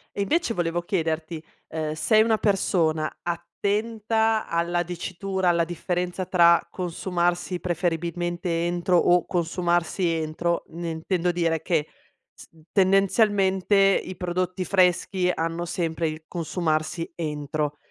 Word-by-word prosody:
E 200 Hz, -, 0 dB
invece 295 Hz, -, 0 dB
volevo 175 Hz, -2 st, -1 dB
chiederti: 165 Hz, -2 st, -2 dB, 0.3 s
ehm, 155 Hz, -1 st, -3 dB
sei 215 Hz, +7 st, +4 dB
una 220 Hz, -1 st, +2 dB
persona 165 Hz, -7 st, +1 dB
attenta 215 Hz, +5 st, -1 dB
alla 170 Hz, +1 st, 0 dB
dicitura, 185 Hz, +2 st, -3 dB
alla 170 Hz, -1 st, +3 dB
differenza 180 Hz, +2 st, -3 dB
tra, 170 Hz, -2 st, +5 dB
consumarsi 175 Hz, 0 st, -1 dB
preferibilmente 175 Hz, 0 st, -1 dB
entro 175 Hz, +1 st, +1 dB
o 175 Hz, +1 st, +3 dB
consumarsi 175 Hz, +1 st, 0 dB
entro 165 Hz, +1 st, -1 dB
ne 170 Hz, +1 st, -5 dB
intendo 170 Hz, +2 st, -1 dB
dire 165 Hz, -2 st, 0 dB
che 160 Hz, -4 st, 0 dB, 0.5 s
s -, -, -15 dB, 0.2 s
tendenzialmente 195 Hz, 0 st, +3 dB, 0.3 s
i 185 Hz, -, -8 dB
prodotti 185 Hz, +1 st, -2 dB
freschi 180 Hz, 0 st, +2 dB
hanno 165 Hz, 0 st, -2 dB
sempre 165 Hz, -1 st, -1 dB
il 155 Hz, +1 st, -7 dB
consumarsi 165 Hz, -1 st, -2 dB
entro. 150 Hz, -2 st, -3 dB
175 Hz, 115 wpm, -25 LUFS, 165-185 Hz, 0.5 s, tra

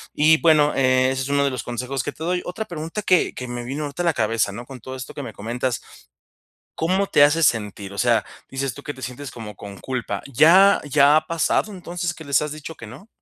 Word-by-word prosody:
Y, 155 Hz, +2 st, +5 dB
bueno, 155 Hz, -3 st, +4 dB
eh, 130 Hz, -1 st, +3 dB
ese 130 Hz, 0 st, -2 dB
es 135 Hz, -, -5 dB
uno 140 Hz, 0 st, +2 dB
de 140 Hz, -, +1 dB
los 130 Hz, -, -4 dB
consejos 125 Hz, +2 st, -3 dB
que -, -, -3 dB
te 160 Hz, -, -9 dB
doy. 180 Hz, +2 st, 0 dB
Otra 220 Hz, +5 st, -4 dB
pregunta 165 Hz, +2 st, -5 dB
que 185 Hz, -2 st, +3 dB
que 125 Hz, -, -6 dB
me 120 Hz, 0 st, -5 dB
vino 135 Hz, +5 st, -4 dB
ahorita 145 Hz, +3 st, -4 dB
a -, -, -2 dB
la 170 Hz, -, +3 dB
cabeza, 110 Hz, -3 st, 0 dB
¿no? 120 Hz, +5 st, -8 dB
Con 130 Hz, 0 st, -10 dB
todo 130 Hz, +3 st, -7 dB
esto 130 Hz, -1 st, -8 dB
que -, -, -6 dB
me 115 Hz, -4 st, -7 dB
comentas, 120 Hz, +4 st, -3 dB, 0.9 s
¿cómo 190 Hz, +4 st, +1 dB
te 145 Hz, -, +5 dB
hace 150 Hz, +3 st, +4 dB
sentir? 105 Hz, -6 st, 0 dB
O -, -, -10 dB
sea, 120 Hz, -2 st, +3 dB, 0.3 s
dices 135 Hz, -1 st, -3 dB
tú 145 Hz, -, -11 dB
que 145 Hz, -, -5 dB
te 130 Hz, -, -13 dB
sientes 130 Hz, +1 st, -6 dB
como 110 Hz, -3 st, -9 dB
con 100 Hz, 0 st, -10 dB
culpa, 120 Hz, -6 st, -4 dB
¿ya 180 Hz, +9 st, +6 dB
ya 145 Hz, 0 st, +5 dB
ha 155 Hz, -, 0 dB
pasado, 170 Hz, +5 st, 0 dB
entonces, 175 Hz, -2 st, -4 dB
que 160 Hz, -, -11 dB
les 140 Hz, -2 st, +2 dB
has 150 Hz, -1 st, -3 dB
dicho 155 Hz, +1 st, -8 dB
que -, -, -10 dB
no? 200 Hz, -, -12 dB
140 Hz, 245 wpm, -22 LUFS, 120-160 Hz, 0.9 s, ya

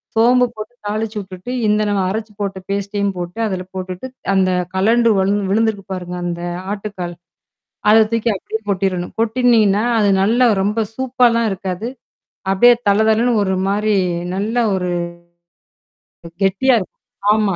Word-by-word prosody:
சோம்பு 245 Hz, +3 st, +5 dB
போட்டு 215 Hz, +2 st, -8 dB
தாளிச்சுவிட்டுட்டு 210 Hz, -1 st, -4 dB, 0.2 s
இந்த 210 Hz, 0 st, +2 dB
நம்ம 200 Hz, -1 st, +1 dB
அரைச்சுப் 215 Hz, +1 st, -5 dB
போட்ட 195 Hz, -1 st, -2 dB
பேஸ்டையும் 200 Hz, 0 st, -1 dB
போட்டு, 175 Hz, +4 st, -6 dB
அதுல 185 Hz, -3 st, -3 dB
போட்டுட்டு 185 Hz, +5 st, -5 dB, 0.3 s
அந்தக் 185 Hz, -2 st, +1 dB
கழண்டு 230 Hz, +4 st, +3 dB
வ -, -, +3 dB, 0.3 s
விழுந்திருக்கு 215 Hz, -2 st, +1 dB
பாருங்க, 180 Hz, -1 st, -5 dB
அந்த 170 Hz, 0 st, -3 dB, 0.3 s
ஆட்டுக்கால். 195 Hz, -4 st, -6 dB, 0.7 s
அதை 220 Hz, +1 st, +7 dB
தூக்கி 230 Hz, 0 st, +1 dB
அப்பிடியே 220 Hz, +3 st, -5 dB
கொட்டிறணும். 185 Hz, -2 st, -1 dB
கொட்டுனீங்கன்னா, 225 Hz, -3 st, +3 dB, 0.2 s
அது 205 Hz, -1 st, +3 dB
நல்லா 235 Hz, +6 st, +3 dB, 0.2 s
ரொம்ப 210 Hz, +3 st, 0 dB, 0.2 s
சூப்பால்லாம் 245 Hz, -3 st, +2 dB
இருக்காது. 190 Hz, +2 st, -4 dB, 0.6 s
அப்பிடியே 240 Hz, +6 st, +6 dB, 0.2 s
தள 200 Hz, -, +4 dB
தளன்னு 235 Hz, +3 st, +3 dB
ஒரு 190 Hz, -1 st, 0 dB
மாரி 210 Hz, +2 st, +1 dB, 0.4 s
நல்ல 210 Hz, +4 st, -2 dB, 0.2 s
ஒரு 180 Hz, -1 st, -2 dB, 1.5 s
கெட்டியா 200 Hz, +7 st, +3 dB
இருக்கும். 185 Hz, -, -10 dB, 0.3 s
ஆமா. 210 Hz, -3 st, +1 dB
205 Hz, 130 wpm, -18 LUFS, 190-225 Hz, 1.5 s, அதை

